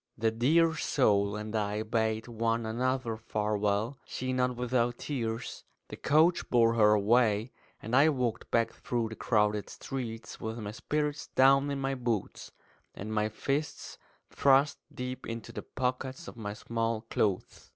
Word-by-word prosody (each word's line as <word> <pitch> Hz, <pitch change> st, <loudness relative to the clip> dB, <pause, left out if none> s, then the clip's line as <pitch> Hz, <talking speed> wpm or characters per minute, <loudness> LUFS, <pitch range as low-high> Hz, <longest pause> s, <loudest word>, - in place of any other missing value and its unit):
The 110 Hz, 0 st, +1 dB
dear 160 Hz, +9 st, +3 dB
soul 100 Hz, -9 st, +2 dB
and 105 Hz, +1 st, -5 dB
I 105 Hz, 0 st, -1 dB
bade 110 Hz, 0 st, -1 dB
one 115 Hz, 0 st, -1 dB
another 120 Hz, 0 st, -1 dB
farewell, 105 Hz, +2 st, -1 dB
she 130 Hz, 0 st, -4 dB
not 125 Hz, 0 st, +1 dB
without 120 Hz, -1 st, 0 dB
tears. 115 Hz, -6 st, -4 dB, 0.3 s
The -, -, -6 dB
coach 160 Hz, +4 st, +3 dB
bore 115 Hz, -2 st, +4 dB
her 105 Hz, -2 st, +5 dB
away; 110 Hz, +1 st, +3 dB, 0.3 s
and 115 Hz, +3 st, -2 dB
I 145 Hz, +4 st, +6 dB
walked 125 Hz, -6 st, -2 dB
back 115 Hz, -1 st, +1 dB
through 120 Hz, -2 st, -2 dB
the 110 Hz, -, -7 dB
crowded 105 Hz, -3 st, +1 dB
streets 115 Hz, -4 st, -6 dB
with 110 Hz, +1 st, -4 dB
my 105 Hz, -3 st, -5 dB
spirits 150 Hz, +5 st, -2 dB
down 135 Hz, +2 st, +4 dB
in 140 Hz, -1 st, -2 dB
my 135 Hz, 0 st, -1 dB
boots, 120 Hz, -6 st, -3 dB, 0.4 s
and 110 Hz, +2 st, -5 dB
my 105 Hz, 0 st, +1 dB
fists 140 Hz, +7 st, -3 dB, 0.3 s
thrust 140 Hz, +1 st, +3 dB
deep 125 Hz, +1 st, -6 dB
into 115 Hz, -1 st, -6 dB
the -, -, -6 dB
pockets 130 Hz, +5 st, -3 dB
of -, -, -9 dB
my 105 Hz, -3 st, -5 dB
small 115 Hz, -1 st, -2 dB
clothes. 105 Hz, -4 st, -2 dB
115 Hz, 150 wpm, -30 LUFS, 110-130 Hz, 0.4 s, I